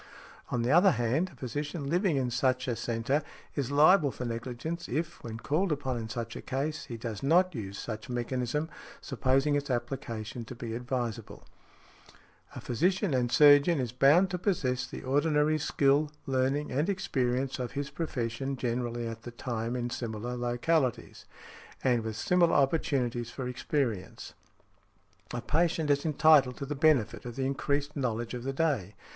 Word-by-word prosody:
On 120 -1 -1
the 120 - +1
other 175 +5 +7
hand, 125 +9 0
a - - -16
physician 145 +4 -4
living 175 0 +2
in 125 -2 0
such 130 +1 +1
a - - +1
|61| 115 - -3
centre 120 +6 0 0.3
is 140 -4 -1
liable 150 +3 +5
for 125 - -6
negligence, 120 +8 -4
if, 160 +6 -3
when 115 -1 -6
called 160 +9 0
upon 135 -3 -1
in 110 -1 -5
such 115 +1 -5
a - - -6
case, 145 +4 -3
he 120 - -6
does 115 -3 -5
not 175 +6 +3
use 100 -6 -6
such 110 0 -6
mechanism, 125 +4 -2 0.3
supposing 135 +2 +1
its 145 0 -1
application 120 -2 -3
to 125 - -8
be 115 -1 -6
advisable. 120 -2 -4 1.1
A - - -6
physician 180 - +1
and 125 -2 +1
surgeon 145 +3 +6
is 125 -3 -2
bound 150 +9 +4
to 180 - -2
possess 130 -10 0
the - - -8
ordinary 150 +3 +2
skill, 140 +1 +2 0.2
learning 135 +2 0
and 145 +8 0
experience 130 -8 -1
of 125 -2 -4
his 140 0 -3
profession 135 -3 -3
generally 120 -1 -2
at 115 0 -6
the 120 - -8
time 120 0 -3
in 120 -1 -2
similar 120 +1 -4
localities, 120 +3 -1 0.6
and 125 -3 +3
with 110 -1 -4
similar 175 +8 +3
opportunities 130 -5 +1
for 125 0 -5
experience. 125 -5 -3 1.0
A 120 - -3
patient 160 +2 +1
is 140 +2 +1
entitled 150 -4 +5
to 140 - -4
the 145 - -3
benefit 140 -7 +2
of 120 -1 -7
the 135 0 -1
increased 140 +2 -1
knowledge 120 -4 -2
of 125 - -4
the 135 - -2
day. 135 - 0
130 Hz, 165 wpm, -29 LUFS, 120-150 Hz, 1.1 s, other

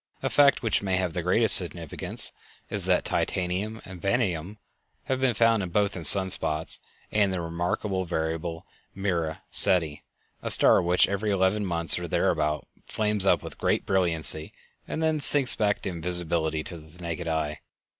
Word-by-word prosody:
A - - -2
fact 140 -2 +3
which 115 - 0
may 95 -2 -2
have 90 -3 -3
the 90 - -3
greatest 110 +6 +4
significance 85 -3 -2 0.4
is - - -3
that - - 0
titanium 95 +5 -3
and 90 -2 -12
vanadium 100 -3 -2 0.5
have 130 -1 -3
been 130 -3 0
found 115 -5 +1
both 100 +2 -1
in 90 - -7
sun 95 +4 +9
spots 75 -1 -2 0.3
and 105 -1 +2
in - - -3
the 95 -1 -4
remarkable 85 +3 -3
variable 80 0 -5 0.3
Mira 85 -5 -3
Ceti, 80 -5 +5 0.4
a - - -5
star - - +4
which 90 +1 +2
every 100 +2 -3
eleven 100 +1 0
months, 85 -4 0
or - - -6
thereabout, 75 -1 -1 0.2
flames 105 -2 0
up - - +2
with - - -11
great - - -1
brilliancy 80 -4 +3 0.3
and 160 - -4
then 160 -1 0
sinks 140 -2 +6
back 105 -1 -1
to - - -5
invisibility 85 -2 -3
with 80 -1 -11
the 90 - -12
naked 85 0 -6
eye. 75 -2 -3
90 Hz, 165 wpm, -25 LUFS, 80-105 Hz, 0.5 s, sun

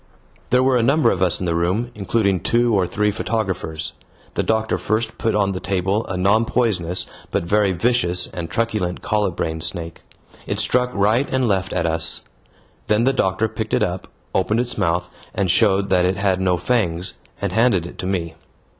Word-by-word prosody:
There 125 +1 +4
were 130 -1 +3
a - - +2
number 135 +1 +3
of 90 - -2
us 90 -3 +2
in 95 - -3
the 85 - 0
room, 90 +9 0
including 100 -2 0
two 120 +6 +2
or 95 -3 +2
three 105 +2 0
photographers. 95 -8 -3 0.4
The - - 0
doctor 110 0 0
first 110 +2 -2
put 115 -2 0
on 100 -2 +2
the 90 - -3
table 95 +3 -1
a 95 - -3
non 100 +5 +3
poisonous 95 -8 0 0.2
but - - -1
very 100 +3 +2
vicious 90 -2 +1
and 85 -2 -6
truculent 105 -6 -2
colubrine 90 -6 -1
snake. 85 0 -3 0.5
It - - -2
struck 125 0 +2
right 110 +7 +2
and 130 -2 +1
left 95 -3 0
at 85 - -1
us. 80 0 0 0.6
Then 105 +2 +2
the 135 +2 +3
doctor 95 -2 +1
picked 110 0 -3
it - - +2
up, 90 -2 -3 0.3
opened 100 +4 +1
its 125 0 -4
mouth, 85 +1 0 0.3
and 95 -3 +1
showed 100 -2 +3
that 90 -1 +3
it 90 0 0
had 95 -2 +1
no 90 -1 +2
fangs, 90 -3 0 0.3
and - - -2
handed 110 -6 +2
it 85 - -10
to 90 - -3
me. 90 -4 -2
100 Hz, 190 wpm, -21 LUFS, 90-110 Hz, 0.6 s, There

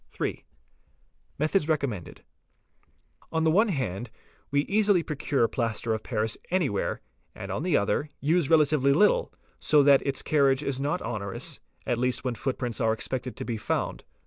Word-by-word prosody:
8. - - -2 0.9
METHODS 155 +2 +1
RECOMMENDED 140 - -2 1.0
®89), - - -28
On 160 0 +1
the 160 - +4
one 210 +7 +4
hand 125 - -3 0.4
we 140 0 +2
easily 200 0 +2
procure 145 -5 0
plaster 115 -1 -1
of 110 - -2
paris 110 -2 -2
anywhere, 165 - 0 0.3
and, 100 - -7
_ - - -2
on - - -3
the 175 -1 +2
other, 105 +9 0
use 160 +1 +1
relatively 150 -3 +4
little, 210 - +3 0.3
so 150 -2 +4
that 140 -1 +6
its 135 -1 -1
carriage 140 -2 +2
is 135 -2 -1
not 145 +1 -1
onerous, 105 -4 -3 0.3
at 120 - 0
least 125 0 0
when 125 -2 -1
footprints 125 -2 -3
are 110 -1 +3
expected 125 +3 -4
to - - -5
be 115 -2 -3
found. 110 - -2
140 Hz, 165 wpm, -27 LUFS, 115-155 Hz, 1.0 s, that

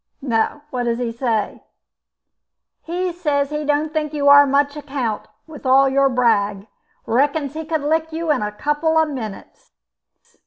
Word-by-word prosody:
"No, 245 +3 -1
what 245 -1 -2
does 235 -1 0
he 240 -1 -2
say?" 230 -3 -2 1.2
"He 355 +2 -3
says 295 -5 -1
he 300 0 -2
don't 300 +1 0
think 305 -1 -2
you 285 -1 +3
are 285 0 +8
of - - -3
much 285 +1 +1
account 270 -7 -4 0.2
with 315 -3 -12
all 270 +1 +5
your 275 +1 +3
brag. 210 -5 +1 0.4
Reckons 280 +3 0
he 320 +1 -6
could 315 -1 -1
lick 320 +2 0
you 325 0 -1
in 280 - +1
a 210 0 -2
couple 295 +8 0
of 320 -1 +3
minutes." 225 -8 -8
285 Hz, 165 wpm, -20 LUFS, 245-305 Hz, 1.2 s, are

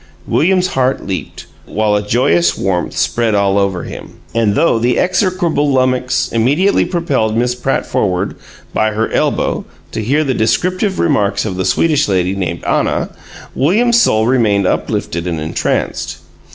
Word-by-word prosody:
William's 185 +3 +2
heart 130 -4 0
leaped, 95 -2 -5 0.2
while 105 0 0
a 105 - +1
joyous 85 -6 +2
warmth 90 -3 -2
spread 115 -3 +1
all 100 0 +2
over 95 -3 -1
him. - - -9 0.2
And 110 -3 +1
though 140 -5 +2
the 120 +2 +1
execrable 180 -5 +1
lummox 130 -1 +1
immediately 145 - +2
propelled 135 - -1
Miss 125 +1 +1
Pratt 125 +2 -1
forward 95 0 -1 0.4
by 110 0 +1
her 110 +1 -1
elbow - - 0 0.3
to 110 - -3
hear 145 +8 +1
the 135 -3 0
descriptive 185 - 0
remarks 100 +5 +1
of 95 -4 -3
the 95 0 -2
Swedish 150 -3 +2
lady 95 -2 +1
named 85 -3 -3
Anna, - - 0 0.4
William's 235 - +3
soul 110 - +3
remained 110 -6 +2
uplifted 85 -1 -2
and 85 -2 -2
entranced. 80 +1 -2
115 Hz, 150 wpm, -15 LUFS, 100-145 Hz, 0.4 s, William's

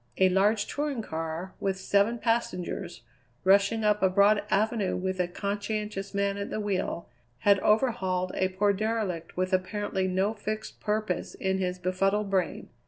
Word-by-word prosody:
A 190 0 +5
large 205 +3 +3
touring 285 -5 -2
car, 165 +2 -4
with 195 -1 -1
seven 200 +4 +2
passengers, 225 - -2 0.4
rushing 200 +3 +4
up 210 0 +2
a 190 - +4
broad 200 +2 +4
avenue 215 -1 +1
with 185 0 -2
a 180 - +2
conscientious 205 +1 -3
man 200 0 +1
at 200 - -4
the - - -3
wheel, 195 -4 -2 0.3
had 200 -1 +5
overhauled 190 -5 +1
a 185 - +1
poor 200 +2 +1
derelict 200 -6 -2
with 185 +1 0
apparently 190 0 0
no 190 +3 +1
fixed 215 0 -5
purpose 210 -3 -2
in 190 0 -1
his 180 -1 -1
befuddled 195 +3 0
brain. 185 -3 -1
200 Hz, 155 wpm, -28 LUFS, 185-210 Hz, 0.4 s, A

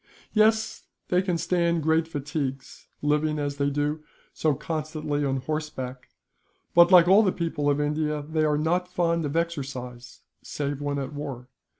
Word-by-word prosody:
"Yes, 220 0 +2 0.2
they 180 0 +3
can 180 -3 -1
stand 170 -1 +1
great 160 +1 +2
fatigues; 145 -3 -5 0.2
living, 150 +1 +1
as 145 -1 -3
they 140 0 +1
do, 145 +2 -1 0.3
so 155 -3 +1
constantly 155 -1 -3
on 135 -1 0
horseback 130 -3 -5 0.6
but, 175 +1 +7
like 175 -2 +8
all 195 +4 +7
the 195 -4 +2
people 165 -5 -1
of 145 0 +1
India, 150 0 -1
they 155 0 0
are 150 -1 +2
not 175 +4 0
fond 170 -2 +1
of 145 +1 -3
exercise, 135 -7 -4 0.2
save 145 -1 -4
when 145 0 -2
at 135 +1 -4
war. 135 -4 -6
150 Hz, 160 wpm, -26 LUFS, 145-170 Hz, 0.6 s, like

